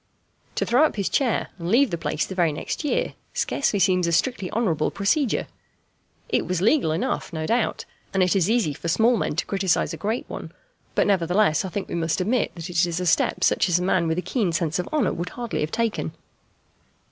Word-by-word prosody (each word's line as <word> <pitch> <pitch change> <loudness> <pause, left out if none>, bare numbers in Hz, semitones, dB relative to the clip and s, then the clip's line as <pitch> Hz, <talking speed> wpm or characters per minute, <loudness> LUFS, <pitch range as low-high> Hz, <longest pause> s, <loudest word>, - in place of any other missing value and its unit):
To - - 0
throw 250 +6 +4
up 315 - +2
his 200 -3 -1
chair 255 -6 +1
and 170 0 -4
leave 250 +4 +4
the - - 0
place 155 -1 -1
the - - -7
very 175 -4 +2
next 150 - -4
year - - 0 0.2
scarcely 245 -7 0
seems 180 -2 +3
a - - +1
strictly 185 +2 0
honourable 185 -10 0
procedure. 225 +6 0 0.8
It - - 0
was 185 -1 0
legal 225 - +3
enough 240 +12 -2
no 160 -2 -3
doubt, 235 +8 0 0.3
and 190 -1 +2
it 180 +2 +2
is 190 0 +2
easy 220 -10 +2
for 165 - -7
small 225 +8 +3
men 195 - -1
to 160 - -1
criticize 190 -3 0
a - - -5
great 220 +4 -2
one, - - -7 0.4
but - - +3
nevertheless 180 -2 +2
I 190 - -4
think 195 +1 -4
we - - -7
must 165 0 0
admit 225 +7 +1
that 170 -1 -6
it 175 -1 +1
is 170 0 -1
a 180 - -2
step 165 - +2
such - - +3
as 175 - +4
a 180 - -1
man 180 -2 +2
with 160 +1 0
a 180 - -1
keen 215 -9 0
sense 165 0 -1
of 180 - -3
honour 295 -11 +1
would 175 +2 -4
hardly 240 -2 -4
have 150 +1 -2
taken. 230 -1 -1
185 Hz, 220 wpm, -24 LUFS, 170-230 Hz, 0.8 s, throw